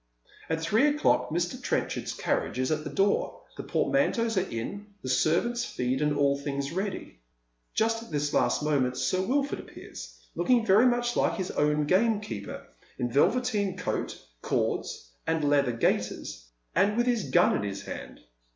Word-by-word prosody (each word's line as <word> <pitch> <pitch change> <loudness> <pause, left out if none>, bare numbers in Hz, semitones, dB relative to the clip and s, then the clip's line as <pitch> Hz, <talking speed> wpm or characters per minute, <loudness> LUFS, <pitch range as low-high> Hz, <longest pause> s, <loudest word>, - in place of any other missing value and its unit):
At 160 0 -1
three 215 - +3
o'clock 295 +1 +2
Mr. 175 +2 -2
Trenchard's - - -1
carriage - - -1
is 130 +2 0
at 155 0 0
the 150 - -5
door, 200 +1 0
the - - -5
poiimanteaus 235 -5 +1
are 190 0 0
in, 200 - -5 0.2
the 130 - -4
servants 235 - +2
feed, 125 - -2
and 150 0 +2
all 140 -1 +3
things 140 0 -3
ready. 190 - -4 0.6
Just 225 +1 +1
at 230 - -12
this 145 -1 -1
last - - +2
moment 135 -4 +1
Sir 185 - +1
Wilford 275 +7 0
appears, - - -10
looking 245 -3 +2
very 215 +5 +6
much 240 0 +1
like - - +2
his 185 -3 -3
own 150 0 +1
gamekeeper, 190 - 0 0.3
in 120 -1 -2
velveteen 205 - +2
coat, - - -3 0.2
cords, - - -2 0.2
and 160 -1 +1
leather 140 -3 +3
gaiters, 65 - -1 0.3
and 200 +5 +2
with 240 - +3
his 240 -4 0
gun 175 0 +4
in - - 0
his 100 -1 -4
hand. - - -8
180 Hz, 160 wpm, -28 LUFS, 140-225 Hz, 0.6 s, very